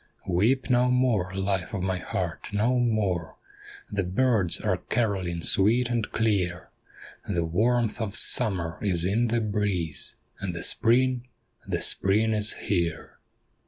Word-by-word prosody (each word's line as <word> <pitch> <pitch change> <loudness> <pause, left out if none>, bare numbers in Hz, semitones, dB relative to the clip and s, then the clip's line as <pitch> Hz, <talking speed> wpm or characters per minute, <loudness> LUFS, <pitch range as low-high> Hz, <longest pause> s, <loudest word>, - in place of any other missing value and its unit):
Weep 110 +9 +1
no 125 -1 +3
more, 125 -8 +1
life 95 +2 -2
of 95 - -3
my 95 -1 -1
heart, - - -4
no 115 +5 +1
more! 100 -9 0 0.6
The 100 -1 0
birds 100 0 +1
are - - 0
carolling 95 -7 -2
sweet 115 +8 +3
and 115 -3 -1
clear; 95 -5 -1 0.6
The 85 -4 0
warmth 115 +7 +1
of 105 -2 -3
Summer 90 -9 +2
is 90 -4 0
in 110 +6 +1
the 115 +1 0
breeze, 100 - -1 0.2
And 95 -3 -4
the 85 - -4
Spring 125 +1 +2 0.2
— - - -32
the - - -2
Spring 110 +3 +2
is 105 0 +1
here. 85 -5 -3
105 Hz, 140 wpm, -26 LUFS, 90-120 Hz, 0.6 s, no